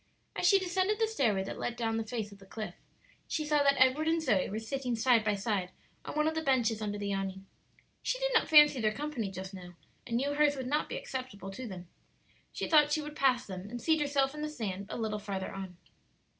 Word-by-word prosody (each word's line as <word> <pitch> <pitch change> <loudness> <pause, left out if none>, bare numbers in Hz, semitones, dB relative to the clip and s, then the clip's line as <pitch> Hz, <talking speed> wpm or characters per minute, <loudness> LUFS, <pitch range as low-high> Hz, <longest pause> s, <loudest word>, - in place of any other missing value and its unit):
As 355 - +2
she 395 - +7
descended 375 +2 0
the 450 - +3
stairway 230 - +1
that 195 - -6
led 240 - -2
down 225 -1 -1
the 225 - -1
face 220 -2 -4
of 200 - -13
the 195 - -16
cliff, 215 +2 -6 0.5
she 310 - -2
saw 300 -1 +3
that 280 -1 +3
Edward 260 +5 +4
and 330 +1 +3
Zoe 245 - +1
were 210 - -3
sitting 245 +2 -2
side 230 0 +4
by 210 -1 +1
side 200 -3 -1 0.3
on - - -7
one 305 0 +2
of 320 - +1
the 320 - -1
benches 240 -7 +1
under 205 -1 -2
the 200 -1 -2
awning. 195 0 -4 0.6
She - - -1
did - - -1
not 460 - +4
fancy 295 -4 +7
their 215 -1 +2
company 285 -8 -3
just 190 0 -7
now, 180 -2 -10 0.3
and 235 - 0
knew 280 +3 0
hers 290 0 +3
would 260 -2 -4
not 295 +4 0
be - - -3
acceptable 240 -7 -6
to 245 +6 -7
them. 180 -4 -8 0.6
She - - -3
thought 295 -2 +5
she 310 0 +1
would 300 0 -8
pass 255 -3 +2
them 190 0 -7
and 240 +2 -5
seat 315 +6 +2
herself 280 -1 +1
in 300 - -6
the 305 - -2
sand 200 -9 -4
a - - -4
little 215 -2 -2
farther 195 -2 -4
on. 190 -2 -7
245 Hz, 240 wpm, -31 LUFS, 205-295 Hz, 0.6 s, she